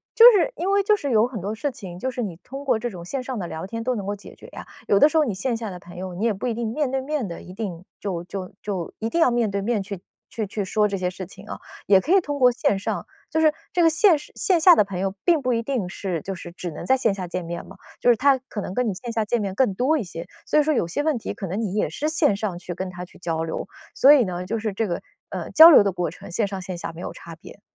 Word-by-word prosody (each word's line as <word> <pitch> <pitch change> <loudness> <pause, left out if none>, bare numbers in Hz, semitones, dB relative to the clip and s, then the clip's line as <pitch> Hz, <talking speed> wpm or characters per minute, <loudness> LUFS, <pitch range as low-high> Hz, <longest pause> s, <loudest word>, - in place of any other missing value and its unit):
就 460 - +8
是 420 +4 +2
因 370 +3 -1
为 400 0 +4
就 425 +2 +4
是 285 -9 -3
有 220 0 +4
很 250 -4 -6
多 200 +4 -3
事 275 +6 -2
情， 190 -8 -9
就 260 - -2
是 250 -1 -3
你 190 -6 -4
通 275 +2 -8
过 250 -5 +2
这 240 - -3
种 175 -5 -9
线 265 +6 -4
上 255 -2 -4
的 185 - -3
聊 165 +2 -6
天 230 +3 -5
都 255 +1 0
能 200 -4 -4
够 205 - -1
解 205 - -13
决 - - -14
呀， - - -10 0.2
有 200 - +4
的 - - +8
时 310 - -8
候 315 - +5
你 225 - -2
线 235 +5 -1
下 225 -2 -4
的 180 -2 -8
朋 175 0 -13
友， 185 0 -6
你 205 +6 -2
也 230 - +2
不 205 +6 -4
一 240 - 0
定 235 -1 -2
面 280 +4 -1
对 265 +1 -1
面 280 -4 -2
地 170 - -7
一 180 - -11
定 185 -4 -6
就 180 -4 -3
就 185 +1 -6
就 190 -5 -4
一 225 - -2
定 335 - 0
要 325 - +6
面 235 -3 +1
对 200 0 -1
面 215 0 0
去 200 0 -6
去 180 - -22 0.3
去 220 -3 -4
去 205 0 -3
说 210 +2 +2
这 200 - -3
些 180 -1 -1
事 185 +1 -7
情 190 +3 -13
啊， - - -6 0.3
也 195 -1 +5
可 330 - +2
以 - - +7
通 290 -4 -4
过 250 -1 +6
线 205 -4 0
上。 195 - -3 0.2
就 320 - 0
是 310 -1 +5 0.2
这 350 - +2
个 330 - +6
线 330 0 +4
上 - - -13
线 355 -4 +2
下 350 +1 +8
的 - - +5
朋 195 -2 -6
友 195 0 -2
并 335 -4 +4
不 255 -1 0
一 230 0 0
定 230 -8 -2
是 180 -4 -4
就 195 +4 -5
是 175 -1 -9
只 175 0 -6
能 - - -7
在 265 - +4
线 230 -5 +1
下 185 -2 -5
见 175 0 -4
面 170 0 -5
嘛， - - -13 0.2
就 - - +3
是 - - +4
他 270 +4 +4
可 255 -5 -7
能 185 - -5
跟 250 -2 +1
你 200 - -1
线 230 +6 -6
下 225 -1 0
见 235 +2 0
面 195 -2 -3
更 250 -5 +2
多 270 +9 +2
一 265 - -2
些， 165 -2 -8 0.2
所 305 - +3
以 - - +4
说 310 +1 +1
有 200 - 0
些 230 - -2
问 305 -3 +1
题 225 - -5
可 195 - -6
能 190 +5 -3
你 205 -5 -2
也 210 - +1
是 305 - -2
线 315 -9 +2
上 200 -5 -3
去 175 -1 -6
跟 185 +2 -4
他 180 0 -7
去 - - -18
交 165 -2 -2
流。 165 +3 -4 0.3
所 280 +2 +8
以 280 -4 +5
呢， 180 -1 -4
就 225 +4 -2
是 215 0 -2
这 215 +2 -1
个， 170 - -3 0.3
呃， - - -5
交 325 +2 +10
流 275 - +8
的 200 - +1
过 175 -3 -2
程， - - -12
线 205 +4 0
上 195 -1 -5
线 185 -1 -6
下 170 - -5
没 165 - -9
有 - - -5
差 165 -1 -11
别。 170 +4 -14
210 Hz, 340 characters per minute, -23 LUFS, 185-260 Hz, 0.3 s, 交